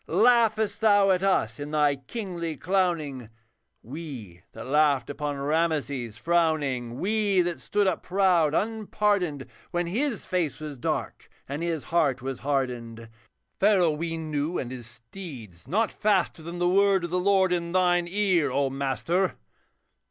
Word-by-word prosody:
Laughest 220 +2 +3
thou 205 -3 +5
at 185 -1 +2
us, 145 - +1
in 145 0 -5
thy 150 -2 +2
kingly 170 - -5
clowning, 165 - -1 0.5
We, 125 - -8
that 115 - -8
laughed 145 -2 +2
upon 145 0 -3
Ramases 140 -6 -1
frowning. 145 -6 0
We 205 -1 +2
that 175 -1 -2
stood 205 0 0
up 190 - 0
proud, 180 -5 +2
unpardoned, 205 -8 0 0.2
When 175 0 -1
his 230 +6 -2
face 180 -6 -1
was 150 -4 -7
dark - - -3 0.2
and 140 +3 -4
his 165 -4 -2
heart 150 -6 +2
was 130 0 -5
hardened? 120 -5 -3 0.5
Pharaoh 190 -5 +4
we 165 +2 -3
knew 155 +1 -2
and 125 - -4
his 125 -3 -7
steeds, 115 - -10
not 215 +8 +1
faster 195 -5 +1
Than 170 +2 -7
the 175 0 +1
word 195 0 +3
of 175 - -4
the 180 - +1
Lord 190 -1 +3
in 170 -1 -2
thine 175 -1 +2
ear, 185 -6 +2
O 135 0 0
master. 140 - -1
165 Hz, 145 wpm, -26 LUFS, 140-190 Hz, 0.5 s, thou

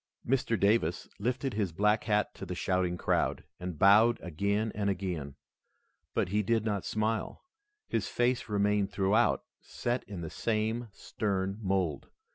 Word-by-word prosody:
Mr. 120 -3 +1
Davis 105 +4 +2
lifted 125 +4 -1
his 100 -4 -1
black 105 +5 +2
hat 105 -1 +1
to - - -10
the 90 -1 -4
shouting 90 -1 0
crowd, - - 0 0.2
and 90 -3 -5
bowed 110 +6 +6
again 100 +6 -1
and 100 -1 0
again. 85 -8 -3 0.8
But - - +1
he 105 +3 +2
did 115 +1 +1
not 105 -3 -1
smile. 110 +1 -1 0.4
His - - -1
face 120 -1 0
remained 105 -1 +1
throughout 105 +4 +2 0.2
set 120 +1 -3
in 100 -4 -7
the 80 - -5
same 115 +1 -1
stern 95 -1 -2
mold. 95 -7 -1
105 Hz, 145 wpm, -30 LUFS, 95-110 Hz, 0.8 s, bowed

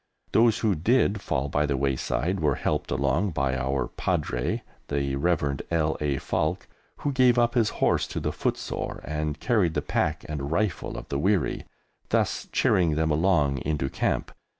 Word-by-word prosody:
Those 115 -1 +4
who 110 -3 +2
did 105 +4 +2
fall 65 +2 -1
by 75 +1 +1
the 70 -2 0
wayside 70 +6 0
were 75 -4 +2
helped - - -1
along 75 +8 +1
by 65 -2 0
our 65 0 -1
Padre, 60 0 -1 0.2
the 70 -1 -1
Rev. 70 -2 0
L. 80 -2 +1
A. 70 -2 0
Falk, 85 +7 -1 0.4
who 145 - +2
gave 125 -2 +4
up 120 -1 +3
his 115 -4 +3 0.2
horse - - +2
to - - -4
the - - -1
footsore - - -3
and 75 0 -3
carried 105 -10 +1
the - - +1
pack - - -1
and 75 -2 -4
rifle 100 +2 -1
of - - -8
the 70 - -1
weary, 95 +1 +1 0.4
thus - - 0
cheering 85 -4 +3
them 80 0 +1
along 75 -4 +2
into 70 -3 -1
Camp. - - -1
75 Hz, 170 wpm, -26 LUFS, 70-95 Hz, 0.4 s, Those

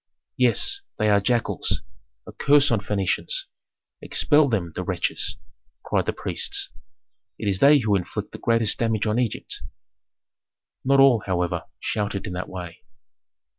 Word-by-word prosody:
"Yes! 400 - +3 0.2
They 110 -1 +2
are 100 - +5
jackals! 120 +3 -1 0.4
A - - -9
curse 145 -1 +4
on 115 - +2
Phœnicians! 105 - -1 0.6
Expel 150 -2 +3
them, 95 -8 -1
the - - -4
wretches!" - - -2 0.5
cried - - 0
the - - +2
priests. - - -2 0.7
"It - - -4
is 95 -2 0
they 145 +5 +7
who 110 -6 +1
inflict 90 -3 -4
the - - -9
greatest 115 -2 +1
damage 115 -2 0
on 110 +2 +1
Egypt." 120 -4 -3 1.2
Not 135 +1 +3
all, 135 -5 +6
however, 90 -2 -1
shouted 105 -2 -2
in 90 - -5
that 90 0 -5
way. 90 -2 -8
110 Hz, 140 wpm, -24 LUFS, 95-130 Hz, 1.2 s, they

